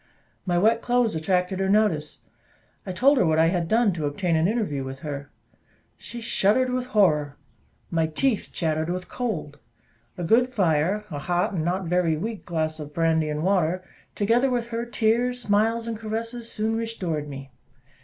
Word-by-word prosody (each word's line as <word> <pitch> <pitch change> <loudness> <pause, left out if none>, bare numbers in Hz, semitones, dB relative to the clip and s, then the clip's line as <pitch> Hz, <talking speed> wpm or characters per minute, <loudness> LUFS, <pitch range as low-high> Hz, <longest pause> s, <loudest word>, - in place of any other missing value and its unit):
My 175 -1 +2
wet 225 +5 +3
clothes 245 -2 +2
attracted 180 +3 0
her 190 0 0
notice. 195 -8 +1 0.7
I - - -2
told 260 +9 +4
her - - +4
what 160 0 +2
I 165 +1 +5
had 175 -2 -1
done 220 0 +3
to 155 -4 -2
obtain 165 +4 0
an 160 +2 +3
interview 200 - -1
with 135 0 -7
her. 145 -1 -6 0.7
She 240 - -8
shuddered 230 +3 +2
with 250 0 -2
horror! 155 - +2 0.5
my 165 -2 +1
teeth 220 - 0
chattered 160 -1 -1
with 180 +1 -3
cold. 185 - -4 0.6
A 175 - -4
good 230 +8 +4
fire, 190 -1 +1
a 145 - -4
hot 175 +5 0
and 165 -4 -1
not 180 +3 -1
very 170 -2 +1
weak 220 +5 -5
glass 160 -2 -2
of 150 -1 -8
brandy 160 -2 +2
and 150 +1 -2
water, 185 -1 +1 0.3
together 235 +6 +2
with 240 -2 -1
her 235 0 -3
tears, 240 +2 +1
smiles, 225 +1 +1
and 230 - -2
caresses, 230 +2 -4
soon 220 +1 -1
restored 185 -10 -3
me. 135 -1 -8
185 Hz, 175 wpm, -25 LUFS, 160-225 Hz, 0.7 s, I